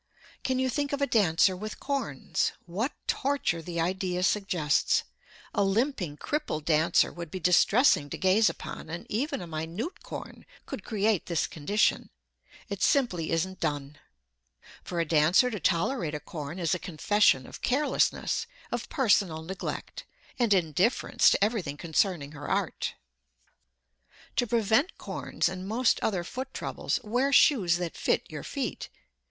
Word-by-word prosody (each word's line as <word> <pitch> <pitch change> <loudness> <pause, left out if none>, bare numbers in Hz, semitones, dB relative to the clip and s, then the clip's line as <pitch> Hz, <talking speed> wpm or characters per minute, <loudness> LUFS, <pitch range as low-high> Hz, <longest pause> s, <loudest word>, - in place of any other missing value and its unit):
Can 260 -1 0
you 260 0 +1
think 285 +2 -1
of 285 - -2
a - - +5
dancer 195 -6 +3
with 215 +3 -7
corns? 270 - -1
What 205 +11 -2
torture 275 -11 0
the 170 +1 -5
idea 180 +1 -1
suggests! 180 -7 +2 0.5
A 200 - +2
limping, 195 - 0
crippled 295 - -3
dancer 165 +1 +3
would 170 -2 -7
be 185 - -5
distressing 180 - +4
to - - -5
gaze 195 +4 +4
upon, - - -8
and 170 +2 -6
even 280 +3 -1
a - - -5
minute 165 - -5
corn - - -8 0.2
could - - -7
create 215 -3 0
this 170 -3 0
condition. 200 +8 0 0.6
It - - -5
simply 210 - +2
isn't 185 +3 -1
done. 145 0 -3 0.8
For 175 - -4
a 165 - +2
dancer 165 - +4
to 210 - -4
tolerate 170 - 0
a - - -3
corn 150 +2 -7
is 170 -2 0
a 180 - -1
confession 180 -5 +2
of - - -11
carelessness, 285 +4 +1 0.2
of - - -3
personal 200 - +2
neglect, 190 +4 -6 0.3
and 235 -3 +2
indifference 185 - +3
to - - +2
everything 200 -10 -1
concerning 165 -2 0
her 145 -1 -8
art. - - -1 1.4
To 245 - +2
prevent 230 - +2
corns - - -2
and 185 +1 -5
most 230 +3 +2
other 190 -5 -1
foot 260 +8 -6
troubles, - - -2
wear 250 +6 +1
shoes 195 - +5
that 175 -2 -4
fit - - 0
your - - -5
feet. - - -4
185 Hz, 145 wpm, -28 LUFS, 165-235 Hz, 1.4 s, a